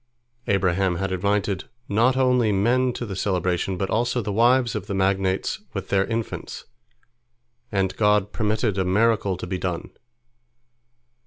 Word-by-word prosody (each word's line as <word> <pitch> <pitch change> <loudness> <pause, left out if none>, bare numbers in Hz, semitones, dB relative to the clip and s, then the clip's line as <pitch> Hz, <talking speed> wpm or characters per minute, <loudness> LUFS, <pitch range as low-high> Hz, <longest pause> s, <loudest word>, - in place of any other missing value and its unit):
Abraham 95 -2 +1
had 95 +2 -2
invited 100 +1 0 0.2
not 120 +5 +2
only 125 -4 +3
men 120 +6 +2
to 120 - -5
the 100 -4 -5
celebration, 90 -1 -1
but 95 +1 -2
also 120 +2 +1
the 105 -3 -3
wives 120 +2 +3
of 95 - -4
the 100 - -3
magnates 95 0 0
with - - -5
their 95 0 +2
infants, 115 0 -5 1.1
and 95 -2 0
God 105 -1 +2
permitted 110 -2 0
a - - +2
miracle 100 0 +2
to - - -6
be 90 +1 -3
done. 90 -2 -4
100 Hz, 145 wpm, -24 LUFS, 95-115 Hz, 1.1 s, only